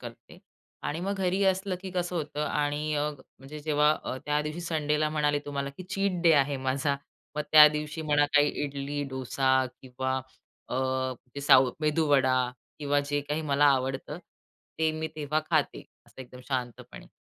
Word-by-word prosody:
करते -, -, -11 dB, 0.5 s
आणि 160 Hz, -, -3 dB
मग 195 Hz, +3 st, -2 dB
घरी 190 Hz, +1 st, +1 dB
असलं, 190 Hz, 0 st, +1 dB
की 190 Hz, -1 st, -7 dB
कसं 180 Hz, -1 st, -2 dB
होतं 150 Hz, -2 st, -3 dB
आणि 150 Hz, +1 st, -1 dB
अ, 150 Hz, +1 st, 0 dB, 0.3 s
म्हणजे 140 Hz, +3 st, -10 dB
जेव्हा 150 Hz, 0 st, +3 dB
अ, -, -, -3 dB
त्यादिवशी 150 Hz, +3 st, -1 dB
संडेला 155 Hz, -2 st, 0 dB
म्हणाले 150 Hz, -1 st, +1 dB
तुम्हाला, 140 Hz, -1 st, -3 dB
की 185 Hz, -, -7 dB
चीट 190 Hz, -1 st, -1 dB
डे 165 Hz, -2 st, +6 dB
आहे 140 Hz, -1 st, +3 dB
माझा. 135 Hz, +2 st, -1 dB, 0.4 s
मग 150 Hz, -, 0 dB
त्या 150 Hz, -1 st, +11 dB
दिवशी 150 Hz, +1 st, -4 dB
मला 145 Hz, -1 st, +3 dB
काही 145 Hz, 0 st, +6 dB, 0.2 s
इडली, 145 Hz, +1 st, -4 dB
डोसा 130 Hz, 0 st, +1 dB, 0.2 s
किंवा 130 Hz, +1 st, -3 dB, 0.5 s
अ, -, -, -4 dB, 0.6 s
ते 140 Hz, -, -5 dB
साउथ 130 Hz, -2 st, +5 dB
मेदूवडा 145 Hz, -4 st, +3 dB, 0.4 s
किंवा 145 Hz, -1 st, +1 dB
जे 145 Hz, 0 st, +1 dB
काही 150 Hz, +2 st, -1 dB
मला 145 Hz, -1 st, +2 dB
आवडतं 135 Hz, +3 st, 0 dB, 0.6 s
ते 160 Hz, -1 st, +2 dB
मी 160 Hz, 0 st, -3 dB
तेव्हा 150 Hz, +1 st, -1 dB
खाते -, -, 0 dB, 0.2 s
असं -, -, -14 dB
एकदम 125 Hz, 0 st, -13 dB
शांतपणे. 125 Hz, -, -5 dB
150 Hz, 160 wpm, -28 LUFS, 140-155 Hz, 0.6 s, त्या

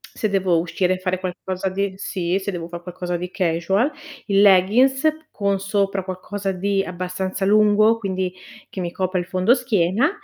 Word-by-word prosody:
se 215 Hz, -, -1 dB
devo 190 Hz, -4 st, +2 dB
uscire 180 Hz, +2 st, 0 dB
e -, -, -7 dB
fare 185 Hz, 0 st, -1 dB
qualcosa 185 Hz, +1 st, -3 dB
di 195 Hz, +1 st, -2 dB
sì, 185 Hz, -1 st, -2 dB
se 200 Hz, +1 st, -4 dB
devo 170 Hz, -2 st, -5 dB
far 175 Hz, 0 st, -8 dB
qualcosa 175 Hz, 0 st, -4 dB
di 180 Hz, +1 st, -5 dB
casual. 185 Hz, -, +1 dB, 0.3 s
Il 200 Hz, -1 st, +3 dB
leggins 220 Hz, +9 st, +5 dB, 0.2 s
con 200 Hz, -1 st, 0 dB
sopra 195 Hz, -1 st, -1 dB
qualcosa 195 Hz, +1 st, -4 dB
di 195 Hz, +1 st, 0 dB
abbastanza 185 Hz, +1 st, -3 dB
lungo, 215 Hz, +2 st, +4 dB
quindi 190 Hz, -3 st, -2 dB, 0.4 s
che 190 Hz, -, -5 dB
mi 175 Hz, -1 st, -3 dB
copra 185 Hz, 0 st, -1 dB
il 175 Hz, -, -3 dB
fondoschiena, 210 Hz, -, +2 dB
190 Hz, 165 wpm, -22 LUFS, 180-200 Hz, 0.4 s, leggins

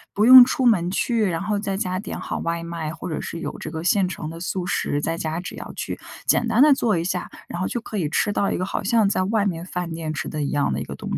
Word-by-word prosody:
不 210 Hz, -, +3 dB
用 255 Hz, +1 st, +12 dB
出 260 Hz, 0 st, -1 dB
门 180 Hz, -7 st, +3 dB
去， 225 Hz, +3 st, 0 dB
然 170 Hz, 0 st, -2 dB
后 205 Hz, 0 st, -1 dB
在 195 Hz, -2 st, -2 dB
家 185 Hz, -1 st, -2 dB
点 210 Hz, -, -6 dB
好 -, -, -4 dB
外 170 Hz, 0 st, -2 dB
卖， 165 Hz, -2 st, -4 dB
或 -, -, -7 dB
者 155 Hz, -, -3 dB
是 170 Hz, -, -6 dB
有 -, -, -5 dB
这 -, -, -6 dB
个 160 Hz, 0 st, -5 dB
现 190 Hz, +1 st, +3 dB
成 165 Hz, -3 st, -5 dB
的 165 Hz, -, -9 dB
速 180 Hz, +1 st, -3 dB
食， 145 Hz, -4 st, -1 dB
在 165 Hz, +2 st, -1 dB
家 160 Hz, +1 st, -3 dB
只 180 Hz, -, -7 dB
要 -, -, -8 dB
去 -, -, -5 dB, 0.3 s
简 -, -, +2 dB
单 -, -, +3 dB
地 300 Hz, -2 st, +7 dB
做 225 Hz, -7 st, +1 dB
一 165 Hz, -, -1 dB
下， 180 Hz, 0 st, -3 dB, 0.2 s
然 175 Hz, -, -6 dB
后 185 Hz, -, 0 dB
就 240 Hz, -, -2 dB
可 220 Hz, -, -6 dB
以 155 Hz, -6 st, -1 dB
吃 205 Hz, -, +1 dB
到 200 Hz, -1 st, +1 dB
一 -, -, -1 dB
个 185 Hz, -, -1 dB
好 195 Hz, -, -3 dB
像 215 Hz, +1 st, +3 dB
在 185 Hz, -, +1 dB
外 210 Hz, +1 st, +1 dB
面 170 Hz, -3 st, -2 dB
饭 180 Hz, -2 st, -4 dB
店 160 Hz, -1 st, -4 dB
吃 -, -, -4 dB
的 150 Hz, -, -4 dB
一 140 Hz, -, -2 dB
样 145 Hz, -, 0 dB
的 70 Hz, -, -2 dB
一 -, -, -3 dB
个 -, -, -7 dB
东 -, -, -4 dB
180 Hz, 315 characters per minute, -23 LUFS, 165-205 Hz, 0.3 s, 用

